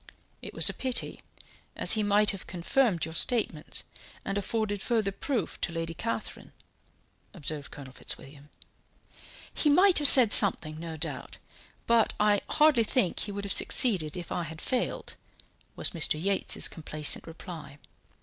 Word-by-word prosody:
"It - - -10
was - - +4
a - - +2
pity, 255 -2 -1 0.5
as - - +3
he 215 - +1
might 205 0 +4
have 195 -2 -10
confirmed 180 - -1
your 160 - -9
statements, 170 -6 -1 0.4
and 195 - -4
afforded 205 0 -3
further 220 -4 -1
proof 235 - -4
to - - -2
Lady 165 0 -5
Catherine," 115 -8 -5 0.8
observed 145 -1 -4
Colonel 135 -3 -12
Fitzwilliam. 140 +2 -7 1.0
"He 300 - +1
might 365 +5 +4
have 295 - +6
said 245 -6 +6
something, 155 -6 +5
no 165 -1 -8
doubt, 150 -5 -5 0.5
but 230 -1 +2
I 210 -1 +2
hardly 300 -6 +3
think 220 -5 -1
he 205 - -3
would 200 0 -6
have 200 - +1
succeeded 185 - +1
if 175 - -9
I 175 - -2
had 160 -1 -8
failed," 250 +5 -3 0.6
was - - 0
Mr. 160 -2 0
Yates's 195 +3 +1
complacent 155 -1 0
reply. 160 -4 -11
195 Hz, 150 wpm, -27 LUFS, 160-225 Hz, 1.0 s, have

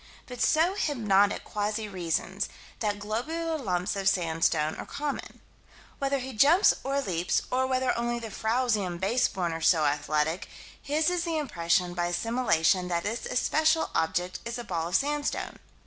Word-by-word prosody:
But 250 -1 -8
so 325 +4 +3
hypnotic 210 - +2
quasi 210 +1 -2
reasons: 185 +1 -2 0.3
that 205 -2 -1
globular 305 +11 -3
lumps 185 - -1
of 195 -1 +2
sandstone 165 -4 +1
are - - -6
common. 290 -1 -5 0.6
Whether 275 0 +1
he 260 0 -6
jumps 295 - +5
or 275 +1 0
leaps, 175 -7 0
or 260 +1 +1
whether 260 0 +1
only 240 0 -1
the 225 -2 -6
frowsy 225 0 +1
and 175 -2 -4
base 215 +7 +2
born 175 -3 -2
are 165 - -5
so 160 -2 +4
athletic, 150 +3 0 0.3
his 305 +4 +1
is 355 -1 0
the 335 -2 -1
impression, 175 - 0
by 175 0 -1
assimilation, 180 -2 +1
that 170 -1 -1
this 225 +4 -3
especial 315 +5 +2
object 175 +3 -1
is 235 0 -4
a 240 - -5
ball 170 -6 -2
of 175 - -2
sandstone. 290 +4 -1
210 Hz, 165 wpm, -28 LUFS, 175-265 Hz, 0.6 s, jumps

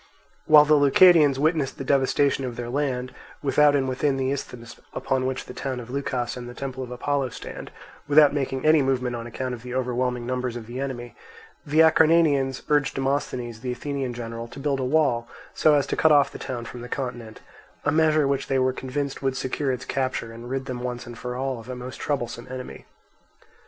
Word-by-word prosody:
While 150 -1 +8
the 155 - +4
Leucadians 145 0 +6
witnessed 155 -1 0
the - - -5
devastation 135 0 +2
of 125 -2 -4
their 120 0 -5
land, 130 -2 -2 0.3
without 145 +1 +4
and 135 -2 +1
within 135 +2 0
the 130 0 0
isthmus 120 -4 -6 0.2
upon 130 -1 0
which 130 0 -3
the - - -9
town 130 -1 -4
of 120 0 -9
Leucas 130 -3 -2
and 120 -1 -7
the 120 - -10
temple 130 -1 -5
of 125 - -8
Apollo 135 +2 -1
stand, - - -8 0.4
without 145 0 +6
making 135 -1 -2
any 155 -1 +6
movement 130 -2 0
on 115 0 -6
account 125 +1 -4
of 120 - -7
the 125 +1 -7
overwhelming 125 -1 -1
numbers 125 -1 -2
of 120 -2 -6
the 120 +3 -7
enemy, 120 -4 -5 0.5
the 155 +2 +4
Acarnanians 155 -4 +4
urged 145 -2 +2
Demosthenes, 130 -4 -2
the 125 +2 -4
Athenian 135 -2 -4
general, 115 -1 -6
to 120 +4 -11
build 140 -1 -1
a - - -1
wall 125 -4 +1 0.3
so 155 -1 +4
as 145 - +2
to - - -2
cut 160 - +4
off 145 -1 +5
the - - -9
town 120 -2 -5
from 120 +1 -8
the 125 - -8
continent, 120 -5 -5 0.4
a 145 - +3
measure 155 -1 +3
which 140 0 -1
they 135 - +1
were 130 0 +2
convinced 140 +2 -4
would 135 -1 -1
secure 135 +1 -1
its 125 -1 -4
capture 130 -4 -2
and 120 +1 -9
rid 135 0 -3
them 125 -2 -5
once 125 -1 -4
and 120 -1 -10
for 125 0 -5
all 130 -1 -2
of 115 +2 -12
a 130 - -4
most 125 +1 -8
troublesome 120 -4 -3
enemy. 130 0 -8
130 Hz, 210 wpm, -25 LUFS, 125-140 Hz, 0.5 s, While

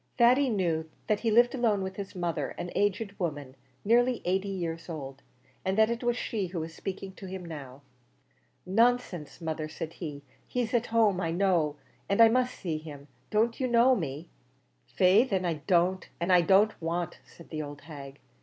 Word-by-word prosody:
Thady 255 +3 +5
knew 170 -7 0 0.2
that 210 -1 +1
he 230 - 0
lived 240 +3 +5
alone 225 -6 +1
with 190 0 -5
his 200 -1 -6
mother, 170 -5 -2
an 175 - -5
aged 205 +1 0
woman, 145 -7 -3 0.3
nearly 245 +3 +3
eighty 190 +2 0
years 170 -3 -4
old, 135 -4 -7 0.4
and 190 +1 -1
that 220 +1 +5
it 235 +1 -3
was 240 0 +1
she 210 -6 -2
who 175 -1 -4
was 160 0 -5
speaking 195 +2 -6
to 190 0 -10
him 185 -1 -6
now. 140 -4 -9 0.8
"Nonsense, 215 - +1
mother," 160 -2 -3
said 160 +1 -6
he; 145 -5 -7 0.2
"he's 245 -2 -2
at 240 -1 +2
home 215 -5 +3
I 165 - -1
know, 170 -4 +1 0.3
and 200 - +1
I 230 -1 +9
must 250 +2 +1
see 160 -5 -3
him. 145 -2 -11 0.2
Don't 225 +2 +1
you 260 - +1
know 240 +2 +5
me?" 155 - -4 0.6
"Faix, 195 - +4
then, 190 -2 0
I 165 -4 -2
don't 180 0 +2
and 175 +2 +2
I 180 - +7
don't 195 +5 +3
want," 170 +1 -2
said 170 - -16
the 155 -1 -3
old 145 -1 -8
hag. 140 -3 -10
185 Hz, 185 wpm, -29 LUFS, 160-220 Hz, 0.8 s, I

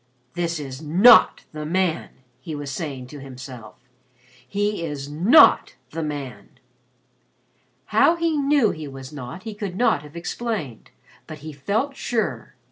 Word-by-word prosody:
"That 170 -2 -2
is 135 -1 -7
not 190 +10 +6
the 155 0 -6
man!" 175 +1 0 0.3
he 160 -4 -7
was 145 -1 -5
saying 135 -2 -5
to 145 - -9
himself. 130 -4 -10 0.7
"He 205 +4 -1
is 145 -3 -5
not 190 - +5 0.2
the 165 - -4
man." 145 -4 -6 1.3
How 335 - +4
he 335 -2 0
knew 280 -6 +3
he 155 -2 -7
was 135 +1 -10
not, 135 +6 -8
he 220 -1 -6
could 205 -3 -5
not 220 -8 +2
have 150 +1 -14
explained, 170 - -4 0.4
but 155 - -9
he 155 - -7
felt 220 - -2
sure. 235 -4 -3
160 Hz, 140 wpm, -23 LUFS, 140-210 Hz, 1.3 s, not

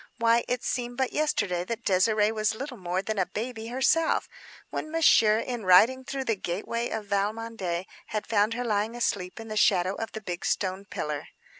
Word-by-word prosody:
Why, 230 0 +3
it 250 -1 -1
seemed 245 -1 -2
but 265 -1 0
yesterday 205 - 0
that 230 +3 -4
Désirée 210 +3 +3
was 215 0 0
little 265 +3 -6
more 185 -2 -2
than 215 0 -2
a 185 - +1
baby 225 0 -5
herself; 265 +7 +2 0.4
when 310 - -4
Monsieur 255 -9 +5
in 235 0 -3
riding 225 +8 +6
through 270 +1 -4
the 225 - +1
gateway 210 +6 -3
of 220 -1 -4
Valmondé 200 -3 -2 0.2
had 215 -1 -3
found 215 0 +2
her 245 +1 -3
lying 215 +1 0
asleep 200 -5 -2
in 225 - -8
the 215 - -5
shadow 190 -3 +3
of 225 +1 -5
the 220 - -5
big 175 -4 -5
stone 190 0 -1
pillar. 150 -5 -4
220 Hz, 185 wpm, -27 LUFS, 195-240 Hz, 0.4 s, riding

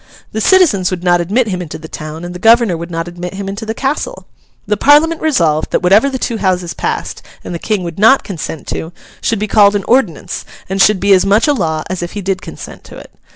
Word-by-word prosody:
The 220 - -3
citizens 295 - +4
would 180 -1 -4
not 175 -1 +3
admit 215 +7 0
him 180 -2 -3
into 165 -4 -7
the 160 - -10
town, 155 +2 -7
and 175 - -7
the 180 - -8
governor 225 -2 +4
would 170 +1 -7
not 165 0 -4
admit 175 +1 -7
him 195 0 -5
into 200 +3 -6
the 220 - -3
castle. 295 - -3 0.4
The 210 - 0
Parliament 300 +8 +4
resolved 165 - +1
that - - -1
whatever 205 +9 +4
the 265 - -3
two 235 -2 -2
Houses 185 -4 -1
passed, - - -4 0.2
and - - -6
the 170 - -4
King 210 -1 -1
would 170 +1 -6
not 225 +6 +5
consent 160 -5 -6
to, 165 +2 -5 0.3
should 225 - 0
be 210 +1 -2
called 205 -1 +4
an 200 - -1
Ordinance, 230 - 0 0.2
and 195 +1 -1
should 210 -1 +4
be 200 +1 +4
as 185 - +4
much 205 +5 +3
a 295 - +3
law 160 - -1
as 185 -1 -4
if 175 - -5
he 205 - -4
did 195 0 -2
consent - - -10
to - - -12
it. - - -13
195 Hz, 245 wpm, -15 LUFS, 175-225 Hz, 0.4 s, not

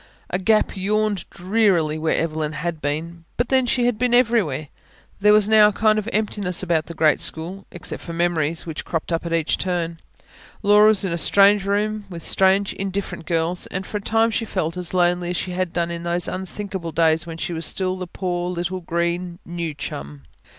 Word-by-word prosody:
A 180 - 0
gap 215 +3 +2
yawned 205 0 -1
drearily 180 -5 +1
where 160 0 +1
Evelyn 155 -2 -1
had 160 +1 -4
been 165 +4 -4
but 240 0 0
then, 260 -2 +3
she 245 0 +1
had 240 -3 0
been 245 -1 +3
everywhere. 210 - +2 0.5
There 210 +1 +5
was 210 -1 +5
now 215 -1 +7
a - - +2
kind 215 +1 +2
of 215 +2 -4
emptiness 205 -4 -1
about 165 -3 0
the 170 - -8
great 155 -1 +3
school 180 +5 -4
except 180 - -6
for 170 - -7
memories, 165 -2 0
which 160 -2 -5
cropped 165 0 -3
up 165 +1 -1
at - - -5
each 165 -2 +1
turn. 170 -2 -2 0.6
Laura 210 +1 +6
was 215 -2 +3
in 180 - -1
a 170 - -2
strange 200 +2 +4
room, 210 +1 -1
with 170 -3 -8
strange, 195 +1 +2
indifferent 195 -3 -4
girls; 170 +1 0
and 185 +1 -4
for 210 - -4
a - - -11
time 225 +2 +2
she 225 - -1
felt 180 -6 -2
as 180 0 -3
lonely 175 0 +2
as 180 - -1
she 185 - -3
had 180 -1 -2
done 170 0 -1
in 170 0 -5
those 170 0 0
unthinkable 190 -2 -5
days 165 +1 +2
when 165 -1 -6
she 170 - -3
was 165 0 0
still 185 -1 -1
the 185 -1 -6
poor 175 -1 -3
little 180 +1 -3
green 170 +1 -2
"new 170 -1 -4
chum". 70 - -7
180 Hz, 205 wpm, -22 LUFS, 165-205 Hz, 0.6 s, now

